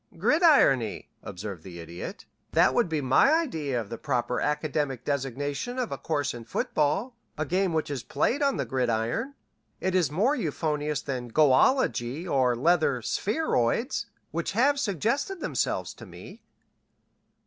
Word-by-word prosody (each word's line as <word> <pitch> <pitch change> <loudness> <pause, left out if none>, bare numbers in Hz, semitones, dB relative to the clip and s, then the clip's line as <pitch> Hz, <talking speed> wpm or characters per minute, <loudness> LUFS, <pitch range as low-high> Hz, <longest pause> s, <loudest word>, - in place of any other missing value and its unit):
"Gridirony," 225 - +3
observed 95 -2 -7
the 85 -1 -10
Idiot. 85 +1 -8 0.3
"That - - +4
would - - +2
be 155 -2 -1
my 135 - +4
idea 160 - 0
of 110 -1 -7
the 115 - -5
proper 125 -3 -1
academic 150 -4 -1
designation 145 - -2
of 250 -3 -2
a - - -3
course 145 -3 -1
in 120 -1 -8
football, 155 - -1 0.2
a 155 - -1
game 185 +4 +1
which 160 -2 -1
is 135 -3 -3
played 235 - 0
on 275 -1 +2
the - - -1
gridiron. 125 - -1 0.4
It 185 - -1
is 180 -4 +2
more 210 - +2
euphonious 150 - -2
than 125 -3 -4
goalology 135 - +2
or 130 -5 +2
leather 140 -3 +2
spheroids, 225 - 0 0.2
which - - -2
have 280 +4 +3
suggested 275 - -1
themselves - - -2
to - - -12
me." - - -12
150 Hz, 145 wpm, -27 LUFS, 125-210 Hz, 0.4 s, That